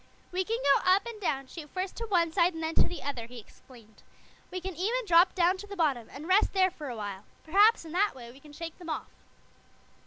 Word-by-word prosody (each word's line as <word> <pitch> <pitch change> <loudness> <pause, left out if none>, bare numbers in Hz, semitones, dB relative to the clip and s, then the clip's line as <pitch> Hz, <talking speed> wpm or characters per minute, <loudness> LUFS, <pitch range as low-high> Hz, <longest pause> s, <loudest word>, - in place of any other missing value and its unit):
"We 370 +1 0
can 450 +4 -2
go 280 -1 +4
up 385 +2 +3
and 460 -3 -8
down, 275 -7 -1
shoot 300 +2 -10
first 375 +1 -4
to 460 - -3
one 345 -5 +2
side 350 -1 +3
and 325 - -5
then 320 +1 -2
to - - +4
the 355 - -7
other," 255 -5 -4
he 245 +1 -11
explained. 225 -1 -16 0.5
"We 370 - -4
can 375 +1 -5
even 450 +8 -1
drop 350 -1 +5
down 360 +1 +3
to 410 +2 -9
the 400 - -7
bottom 280 - 0
and 295 +4 -9
rest 380 +3 +3
there 375 -1 +3
for 300 -5 -8
a 245 - -5
while. 205 -2 -6 0.2
Perhaps, 405 +4 +4
in 320 - -9
that 390 +2 +1
way, 235 -2 -10
we 265 - -16
can 300 +1 -15
shake 330 +3 -8
them 345 -2 -9
off." 310 - -4
335 Hz, 245 wpm, -29 LUFS, 275-380 Hz, 0.5 s, drop